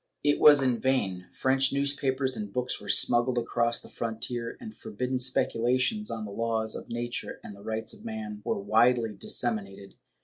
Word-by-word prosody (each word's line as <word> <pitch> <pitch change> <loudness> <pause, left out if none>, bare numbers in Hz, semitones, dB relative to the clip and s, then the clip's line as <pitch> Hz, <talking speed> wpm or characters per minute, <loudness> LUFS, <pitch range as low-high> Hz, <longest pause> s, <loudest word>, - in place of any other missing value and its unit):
^ - - -53 0.2
It 145 0 +2
was 145 -2 +8
in 125 -3 +1
vain. 100 -9 0
French 130 0 +2
newspapers 135 -2 0
and 105 -2 -5
books 125 +3 -2
were - - -9
smuggled 120 +1 +4
across 120 0 +1
the - - -12
frontier, 115 +1 -4
and 225 -3 -9
forbidden 130 -12 -3
speculations 130 - +1
on 110 -1 -4
the 100 - -7
laws 110 0 -1
of - - -8
nature 120 +1 -4
and 100 - -9
the 100 - -14
rights 110 +1 -3
of 215 - -14
man 220 -2 -6
were 225 - -1
widely 120 - +3
disseminated. 100 -2 -2
120 Hz, 175 wpm, -28 LUFS, 115-135 Hz, 0.2 s, was